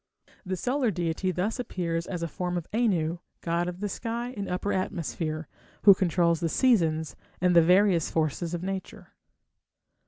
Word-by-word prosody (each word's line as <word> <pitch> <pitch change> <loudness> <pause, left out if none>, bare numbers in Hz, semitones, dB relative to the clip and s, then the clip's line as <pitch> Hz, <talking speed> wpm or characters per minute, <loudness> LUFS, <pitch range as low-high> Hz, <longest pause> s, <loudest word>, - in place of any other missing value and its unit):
The 185 -1 -3
solar 255 +4 +1
deity 175 0 -1
thus 185 +7 -1
appears 170 -7 -2
as 175 -3 -4
a - - -1
form 180 +3 -3
of 170 - -4
Anu, 180 -8 +1 0.2
god 170 +1 0
of 180 +2 -8
the 205 - 0
sky 235 +4 -4
and 200 -2 -4
upper 180 +3 -1
atmosphere, 165 -4 -3 0.4
who 200 - +10
controls 170 -3 +2
the 165 -1 0
seasons 160 - +2 0.2
and 180 0 +3
the 170 - +9
various 180 0 +4
forces 160 +2 -1
of 175 - -5
nature. 190 0 -6
180 Hz, 160 wpm, -27 LUFS, 165-200 Hz, 0.4 s, who